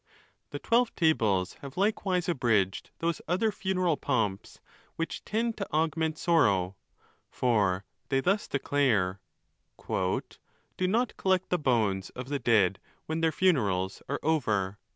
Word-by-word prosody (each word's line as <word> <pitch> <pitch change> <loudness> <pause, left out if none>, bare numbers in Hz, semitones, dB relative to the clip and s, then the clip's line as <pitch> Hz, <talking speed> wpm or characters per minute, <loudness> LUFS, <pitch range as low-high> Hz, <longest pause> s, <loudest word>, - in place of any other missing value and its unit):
The - - -5
Twelve 235 0 +1
Tables 105 - +2
have 140 +1 -9
likewise 190 -3 0
abridged 115 - +1
those 165 0 -1
other 195 +6 +1
funeral 185 -5 0
pomps 110 -8 -2 0.4
which 165 - -4
tend 225 +1 -1
to 195 - -5
augment 160 0 0
sorrow. 100 - +2 0.5
For 100 -6 +1 0.2
they 135 - +2
thus 195 +8 +1
declare,—" 120 -10 +1 0.6
Do 95 0 -2 0.5
not 230 +5 0
collect 185 -1 +1
the 180 - +2
bones 110 -9 +1
of 125 +1 -6
the 145 -1 -1
dead, 100 -7 +3 0.3
when 160 +1 -2
their 165 -1 +3
funerals 105 - +1
are 145 - -1
over." 105 -11 0
145 Hz, 130 wpm, -29 LUFS, -, 0.6 s, dead